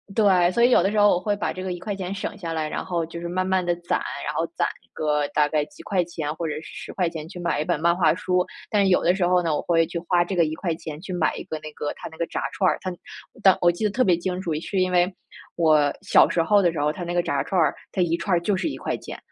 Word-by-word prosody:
对， 185 -5 +4
所 235 +5 +2
以 240 - +6
有 210 - +5
的 195 - +1
时 215 - +1
候 205 - +6
我 175 - +3
会 205 +2 -1
把 205 - -2
这 185 - -6
个 185 -1 -2
¥1 190 0 -4
省 200 +1 -5
下 170 -4 -4
来， 160 -1 -1
然 - - -4
后 170 -3 -1
就 170 +1 -8
是 170 - -4
慢 185 +2 -1
慢 190 -1 +1
地 175 0 +1
攒， 175 0 -1 0.3
然 - - -2
后 - - +1
攒 - - +1 0.3
个 150 -1 0
大 150 -1 +2
概 150 -1 +1
几 195 - -15
块 185 -3 +1
钱 160 -3 -4
或 165 - -4
者 150 - -2
是 155 - -5
¥10 165 -5 -4
去 180 - -9
买 170 -3 0
一 - - -2
本 - - 0
漫 170 +2 +3
画 175 -2 +3
书。 180 -1 0 0.2
但 205 -2 +3
是 195 - +3
有 180 - +4
的 175 +2 +3
时 190 -2 +1
候 180 0 +3
呢， 165 -3 0
我 - - -1
会 165 -1 +2
去 170 - -5
花 175 0 +2
这 190 - -3
个 170 - +4
¥1 160 -1 -4
去 185 0 -6
买 175 -3 +1
一 - - -6
个 160 - -4
那 155 0 -9
个 145 - -4
它 - - -8
那 160 - -14
个 170 - -2
炸 - - -3
串 185 - +2
儿， - - 0
它 185 - -3 0.5
当 190 -2 +6
我 175 - +5
记 175 +5 -3
得 - - +3
特 255 +5 +2
别 180 -6 +4
清 180 +1 -3
楚 170 -4 -2
是 195 +2 -2
因 185 0 +1
为 180 +1 +3 0.4
我 155 -4 +3
小 - - +5
时 165 - +1
候 205 +3 +4
的 175 -3 +3
时 160 - -5
候 145 - +1
儿 150 - -2
它 180 - -6
那 175 - -3
个 175 0 +1
炸 140 -4 0
串 190 - 0
儿， 155 - +3 0.2
它 185 - 0
1 170 -1 +1
串 175 0 +1
就 205 0 +1
是 185 - -1
¥1。 - - -5
175 Hz, 300 characters per minute, -24 LUFS, 165-185 Hz, 0.5 s, 以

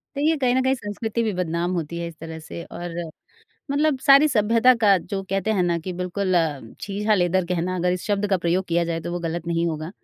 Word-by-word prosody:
तो - - -3
ये 320 +2 +3
कहीं 255 -2 +2
न 260 - +3
कहीं 260 0 +3
संस्कृति 220 0 -3
भी 215 - 0
बदनाम 175 0 -1
होती 170 -1 -3
है 170 - -3
इस 165 - -10
तरह 160 0 -7
से 170 +2 -8
और 175 -1 -7 0.8
मतलब 290 -1 +2
सारी 275 +2 +6
सभ्यता 230 +2 +4
का 200 -2 +6
जो 195 +3 -5
कहते 195 +2 0
हैं 190 -4 +1
ना 170 -1 +1
कि 180 +3 -5
बिल्कुल 180 +1 -2
अ, 155 -5 +1 0.2
छीछालेदर 195 -3 +1
कहना 180 +1 -1
अगर 180 0 +1
इस 180 - -3
शब्द 205 0 0
का 190 - +4
प्रयोग 175 +2 0
किया 170 0 +1
जाए, 165 -1 -2
तो 170 +1 -5
वो 175 - -2
गलत 170 0 -4
नहीं 170 0 0
होगा। 155 0 -3
180 Hz, 235 wpm, -23 LUFS, 170-210 Hz, 0.8 s, सारी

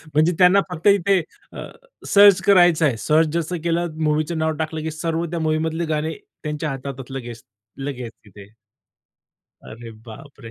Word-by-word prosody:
म्हणजे 155 +3 +4
त्यांना 185 +2 +6
फक्त 170 +3 -3
इथे 200 -2 +3 0.3
अ, - - -7 0.4
सर्च 200 -2 +6
करायचं 175 -5 +4
आहे. 125 -6 0
सर्च 155 +6 +2
जसं 170 +1 -2
केलं, 170 -1 -2
मूव्हीचं 155 +2 0
नाव 160 0 0
टाकलं 160 0 -3
की 160 +1 -4
सर्व 165 +2 -3
त्या 170 - -3
मूव्हीमधले 160 +1 -1
गाणे 155 0 -2 0.3
त्यांच्या 150 0 -3
हातात 135 -1 -7
लगेच, 120 -4 -8 0.4
लगेच 130 -4 -6
तिथे. 100 0 -14 1.2
अरे 115 +1 -10 0.2
बाप 135 +5 -13
रे! 115 -3 -10
155 Hz, 155 wpm, -21 LUFS, 140-170 Hz, 1.2 s, त्यांना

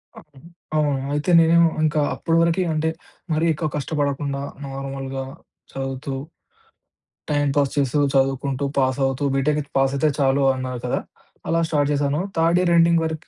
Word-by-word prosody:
అ - - -10 0.6
అవును. 150 -1 +2 0.2
అయితే 150 +3 -1
నేనేం 165 +1 +5 0.2
ఇంకా 155 0 +2
అప్పడివరకీ 165 +2 +1
అంటే 155 +1 0 0.4
మరీ 155 +1 +1
ఎక్కువ 155 0 -2
కష్టపడకుండా 140 -1 -2 0.2
నార్మల్‌గా 135 0 -5 0.5
చదువుతూ 135 +1 -4 1.2
టైమ్ 145 -1 +1
పాస్ 140 -2 +2
చేస్తూ 140 +1 +1 0.2
చదువుకుంటూ, 135 0 0
పాస్ 130 0 +1
అవుతూ 135 +1 -2
బిటెక్ 145 +1 0
పాస్ 135 0 +2
అయితే 150 +3 +2
చాలు 135 0 +2
అన్నారు 130 -1 -4
కదా! - - 0 0.5
అలా 165 - +2
స్టార్ట్ 145 -2 +1
చేశాను 145 +1 0 0.2
థర్డ్ 165 +1 +3
ఇయర్ 175 -1 +2
ఎండింగ్ 170 0 +4
వరకి 160 0 -5
145 Hz, 140 wpm, -22 LUFS, 135-155 Hz, 1.2 s, నేనేం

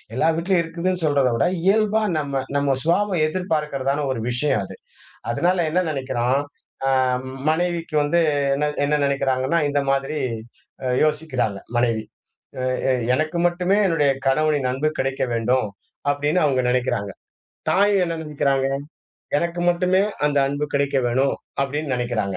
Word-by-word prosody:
எல்லா 130 - +2
வீட்லயும் 175 +1 +2
இருக்குதுன்னு 170 +2 -2
சொல்றதை 140 -4 +2
விட 115 - +2 0.2
இயல்பா 215 +2 +3
நம்ம 140 -3 -2
நம்ம 140 -1 +2
சுபாவம் 175 0 +2
எதிர்பார்க்கிறதான 150 -5 -1
ஒரு 130 - -2
விஷயம் 125 -3 +1
அது. - - -10 0.6
அதனால 180 +9 +1
என்ன 180 +3 +2
நினைக்கிறோம்? 130 -2 0 0.5
அ - - +3 0.6
மனைவிக்கு 170 0 -1
வந்து 150 +4 +2 0.3
என்ன 150 +2 0 0.2
என்ன 150 - +1
நினைக்கிறாங்கன்னா, 135 +2 +1
இந்த 145 0 +1
மாதிரி 135 +2 0 0.7
அ - - 0 0.2
யோசிக்கிறாங்க 150 -9 -1 0.2
மனைவி, 115 -2 +1 0.6
அ - - -2 0.3
அ, - - +4 0.2
"எனக்கு 155 +4 -1
மட்டுமே 180 +3 +1
என்னுடைய 155 -6 +2 0.2
கணவனின் 145 -1 +2
அன்பு 140 +4 0
கிடைக்க 135 0 -1
வேண்டும்." 115 0 +1 0.4
அப்படின்னு 145 +4 +1
அவங்க 135 -3 +2
நினைக்கிறாங்க. 125 -5 0 0.6
தாயும் 200 0 +3
என்ன 165 - -2
நினைக்கிறாங்க? 140 -3 0 0.7
"எனக்கு 170 +2 -2
மட்டுமே 180 +2 +2 0.2
அந்த 145 -1 +1
அன்பு 145 +1 -2
கிடைக்க 140 0 +1
வேணும்." 130 +3 +1 0.3
அப்படின்னு 140 0 -2
நினைக்கிறாங்க. 115 -6 -2
145 Hz, 135 wpm, -22 LUFS, 130-170 Hz, 0.7 s, அ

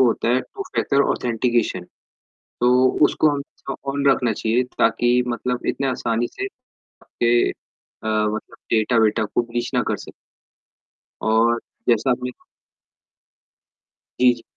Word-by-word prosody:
होता 120 -2 +2
है 125 +2 +3
two 400 - -8
factor 140 0 +2
authentication 120 -5 0 0.8
तो 125 0 +4 0.3
उसको 155 - +3
हमें 140 -1 -6 0.2
ऑन 140 0 -2
रखना 125 -4 +2
चाहिए 115 +4 +1 0.2
ताकि 120 +2 +3
मतलब 125 +1 -2
इतने 135 - 0
आसानी 120 -2 -1
से 395 - -4 0.4
आपके 120 0 0 0.6
मतलब 110 0 -1
डेटा 110 +2 +2
-वेटा 110 0 +2
कोई 115 - -1
ब्रीच 120 0 -3
ना - - +3
कर - - 0
सके। - - -11 1.1
और 115 +2 +3 0.3
जैसा 120 +2 +3
आपने 125 0 -1 1.9
जी, 125 0 +6
जी। - - -15
120 Hz, 125 wpm, -22 LUFS, 115-125 Hz, 1.9 s, जी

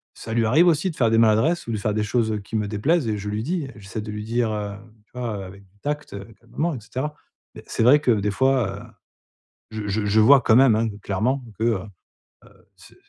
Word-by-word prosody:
ça 110 - -7
lui 115 0 +2
arrive 135 +11 +4
aussi 170 +3 +2
de - - -13
faire 115 -6 +2
des 115 - +4
maladresses 115 +9 +2
ou - - -3
de 110 - -1
faire 105 +1 -1
des 110 - 0
choses, 110 +1 0
heu, 105 - -2
qui 100 +3 -8
me 105 -1 0
déplaisent 130 +8 0
et 110 - 0
je 105 +1 -5
lui 105 +2 -3
dis. 165 -1 -2
J'essaie 105 +1 -7
de 105 - -8
lui 105 0 -5
dire, 115 0 -1
heu, 105 -1 -4 0.3
tu - - -43
vois? 115 -4 -3
Hem, - - -6
avec 100 +1 -12
du 100 +2 -32
tact, 150 +1 -4
heu, 100 -1 -7
calmement 145 +8 -3
et 125 - -6
cetera. 130 +7 -4 0.4
Mais - - -11
c'est - - -1
vrai 140 +5 +6
que 150 - -2
des 105 -1 +1
fois, 120 -5 +1
heu, - - -11 0.9
je 110 -1 -5
je 105 +1 -1
je 105 +2 +3
vois 135 +4 +7
quand 110 - +3
même, 130 -3 +6
hein, 115 +1 +1 0.2
clairement 125 +7 -1 0.2
que, - - -1
heu 115 -1 +2 0.8
heu, - - -26
c'est - - -18
110 Hz, 250 wpm, -23 LUFS, 105-130 Hz, 0.9 s, vois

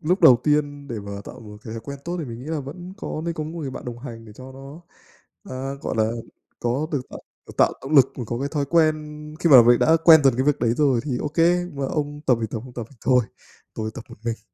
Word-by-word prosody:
lúc 180 +5 +1
đầu 145 -7 +8
tiên 145 -1 0
để 115 -3 -4
mà 100 0 -7
tạo 125 - -10
một 105 -2 -11
cái 110 - -7
thói 115 - -5
quen 140 +5 -8
tốt 175 +1 -3
thì 165 - -3
mình 115 -3 -7
nghĩ - - -9
là 160 -1 -2
vẫn 175 +7 -9
có 155 -8 -5
nên 170 -1 -2
có 155 - -4
một 155 - -6
người 140 -4 -4
bạn - - -8
đồng 120 -1 -6
hành 115 -3 -9
để 110 - -13
cho 130 +4 -11
nó, 135 +4 -11 0.7
à, 135 +1 -4
gọi - - -3
là 110 0 +2 0.5
có 125 +6 0
được 145 - 0
tạo, - - -8 0.3
à, - - -11
tạo - - +4
động 140 +3 -3
lực 135 -1 +6
và 125 - -4
có 120 +1 -3
cái 140 +2 -2
thói 145 -1 -1
quen 155 +1 +3 0.5
khi 170 - +2
mà 130 -4 +10
mình 120 +1 +5
đã 160 +1 +4
quen 160 -4 +8
dần 135 -3 +5
cái 130 - +1
việc 150 0 +2
đấy 115 0 +2
rồi, 135 -5 +3
thì 135 -5 -2
ô 150 - -2
kê, 170 +3 +2
"Mấy 140 -1 -2
ông 145 -1 -3
tập 125 -3 +4
thì 110 - -1
tập 115 - -4
không 130 - -11
tập 120 -3 -5
thì 135 - -19
thôi, 125 -3 +4 0.5
tôi 110 0 -3
tập 115 - -8
một - - -13
mình." 115 -1 -3
135 Hz, 280 wpm, -23 LUFS, 120-150 Hz, 0.7 s, mà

